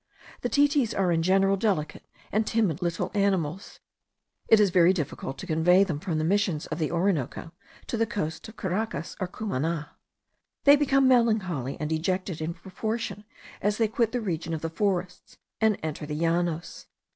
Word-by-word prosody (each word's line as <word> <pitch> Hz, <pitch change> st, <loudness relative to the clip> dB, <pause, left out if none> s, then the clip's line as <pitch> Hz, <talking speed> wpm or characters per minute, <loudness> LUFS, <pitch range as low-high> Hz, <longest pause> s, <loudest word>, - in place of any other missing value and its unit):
The 245 Hz, -, -1 dB
titis 285 Hz, -4 st, +2 dB
are 190 Hz, -2 st, +2 dB
in 165 Hz, -1 st, +2 dB
general 195 Hz, +3 st, +3 dB
delicate 190 Hz, -8 st, -1 dB, 0.3 s
and 215 Hz, +1 st, +1 dB
timid 200 Hz, -7 st, +1 dB
little 175 Hz, +2 st, -2 dB
animals. 190 Hz, -4 st, -1 dB, 0.7 s
It 225 Hz, -, +6 dB
is 205 Hz, -3 st, +4 dB
very 180 Hz, 0 st, +5 dB
difficult 145 Hz, -5 st, -4 dB
to -, -, -7 dB
convey 180 Hz, +3 st, +4 dB
them 165 Hz, -7 st, -3 dB
from 165 Hz, -1 st, -2 dB
the 155 Hz, -, 0 dB
Missions 185 Hz, -3 st, +1 dB
of 155 Hz, -, -5 dB
the 155 Hz, -, 0 dB
Orinoco 170 Hz, -4 st, -1 dB, 0.3 s
to 235 Hz, -, -3 dB
the 225 Hz, 0 st, +1 dB
coast 160 Hz, -4 st, -4 dB
of 220 Hz, -, -12 dB
Caracas, 190 Hz, -3 st, -3 dB
or 185 Hz, -, -1 dB
of -, -, -28 dB
Cumana. 165 Hz, -6 st, -2 dB, 0.7 s
They 285 Hz, 0 st, +8 dB
become 275 Hz, -2 st, +3 dB
melancholy 210 Hz, -, +2 dB
and 150 Hz, -, -2 dB
dejected 175 Hz, +2 st, -2 dB
in 165 Hz, +2 st, -3 dB
proportion 210 Hz, +4 st, -4 dB, 0.4 s
as 205 Hz, 0 st, +1 dB
they 225 Hz, -, +2 dB
quit 225 Hz, +1 st, 0 dB
the 245 Hz, -, -1 dB
region 165 Hz, -5 st, -2 dB
of 155 Hz, -, -6 dB
the 165 Hz, -, -3 dB
forests, 180 Hz, -1 st, -2 dB, 0.2 s
and 220 Hz, -2 st, +3 dB
enter 155 Hz, -1 st, -4 dB
the 150 Hz, -, -4 dB
Llanos. 170 Hz, +1 st, -1 dB
185 Hz, 175 wpm, -27 LUFS, 160-215 Hz, 0.7 s, They